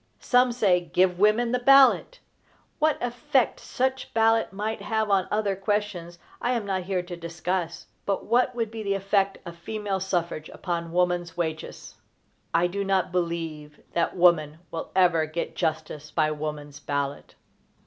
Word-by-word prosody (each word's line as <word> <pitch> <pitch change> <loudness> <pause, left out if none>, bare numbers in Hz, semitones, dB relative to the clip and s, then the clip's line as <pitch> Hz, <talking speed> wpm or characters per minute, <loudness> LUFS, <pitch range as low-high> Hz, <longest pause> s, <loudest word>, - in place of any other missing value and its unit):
Some 250 0 +3
say: 200 -7 +3
"Give 180 +1 +1
women 215 +3 +3
the 250 - +1
ballot." 275 - +5 0.6
What 310 0 +3
effect 250 +2 +1
such 260 +1 -2
ballot 225 0 +3
might 210 +2 -3
have 220 0 -1
on 190 -2 +3
other 210 -2 0
questions 195 -4 -2 0.2
I 245 - +1
am 230 -4 -1
not 190 -2 -1
here 185 -1 -1
to 175 0 -7
discuss; 170 0 -3 0.2
but 200 -1 -1
what 245 +2 +2
would 230 -3 -2
be 225 -1 -6
the 200 -2 0
effect 195 0 +1
of 170 - -8
female 205 +2 -3
suffrage 175 -4 -2
upon 170 -2 -4
woman's 175 -1 0
wages? 160 -2 -5 0.5
I 170 - +3
do 200 +3 -2
not 195 -2 +1
believe 165 -4 -3
that 170 +2 0
woman 160 -4 +4
will 165 - -5
ever 175 -4 +4
get 155 +2 -4
justice 155 -1 -3
by 155 0 +1
woman's 150 -1 -5
ballot. 140 0 -3
185 Hz, 155 wpm, -26 LUFS, 170-215 Hz, 0.6 s, ballot